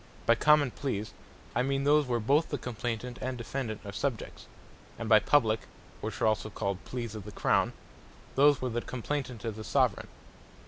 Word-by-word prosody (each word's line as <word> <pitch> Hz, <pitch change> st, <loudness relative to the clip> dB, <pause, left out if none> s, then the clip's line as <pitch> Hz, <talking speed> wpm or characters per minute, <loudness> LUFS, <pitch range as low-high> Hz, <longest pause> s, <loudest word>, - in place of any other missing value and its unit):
By 115 Hz, -, +6 dB
Common 145 Hz, +2 st, +4 dB
Pleas, 110 Hz, -7 st, -3 dB, 0.4 s
I -, -, +2 dB
meane 135 Hz, +1 st, 0 dB
those, 145 Hz, 0 st, +4 dB
where 120 Hz, -1 st, +1 dB
both 140 Hz, +9 st, +2 dB
the 145 Hz, -, -1 dB
Complaynant 120 Hz, 0 st, -4 dB
and 130 Hz, -1 st, -3 dB
Defendant 120 Hz, -2 st, -4 dB
are 100 Hz, -, -5 dB
Subjects: 120 Hz, +2 st, -4 dB, 0.5 s
and 115 Hz, -, -4 dB
by 110 Hz, -1 st, +7 dB
Publique, 110 Hz, -5 st, +2 dB, 0.3 s
(which -, -, -4 dB
are -, -, +5 dB
also 110 Hz, 0 st, +1 dB
called 100 Hz, -2 st, -3 dB
Pleas 120 Hz, -3 st, -4 dB
of 110 Hz, -2 st, -6 dB
the 105 Hz, -, -8 dB
Crown) -, -, +2 dB, 0.6 s
those, 145 Hz, -1 st, +5 dB
where 125 Hz, -, -1 dB
the 120 Hz, +1 st, -1 dB
Complaynant 125 Hz, -2 st, -4 dB
is 110 Hz, -2 st, -3 dB
the 110 Hz, -, -6 dB
Soveraign. 125 Hz, -5 st, +1 dB
120 Hz, 180 wpm, -30 LUFS, 110-135 Hz, 0.6 s, by